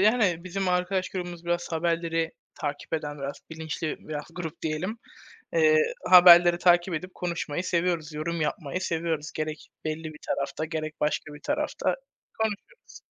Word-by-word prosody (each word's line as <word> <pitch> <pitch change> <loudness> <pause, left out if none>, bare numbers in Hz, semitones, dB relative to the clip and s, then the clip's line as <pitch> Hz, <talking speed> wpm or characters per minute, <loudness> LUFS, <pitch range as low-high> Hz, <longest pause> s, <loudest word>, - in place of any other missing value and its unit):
yani 200 -5 +3
bizim 190 +1 -2
arkadaş 180 +1 +1
grubumuz 175 -2 -5
biraz 175 0 -1
haberleri 165 0 0 0.3
takip 145 -2 -4
eden, 150 -2 -3
biraz 140 0 -5
bilinçli, 160 0 -4
biraz 150 -1 -6
grup 165 -4 -6
diyelim, 165 +8 -2 0.6
eee, 470 -1 +5 0.3
haberleri 175 -1 +9
takip 175 0 +4
edip 185 +4 -5
konuşmayı 170 -1 -3
seviyoruz, 170 -3 0
yorum 160 +2 -3
yapmayı 155 +2 -2
seviyoruz. 165 -3 -2
Gerek 155 0 -4 0.2
belli 155 +1 -3
bir 155 -1 -7
tarafta, 140 +2 -2
gerek 155 -1 -4
başka 150 0 -1
bir 150 - -11
tarafta - - -1 0.4
konuşuyoruz. 220 - -4
170 Hz, 140 wpm, -27 LUFS, 155-180 Hz, 0.6 s, haberleri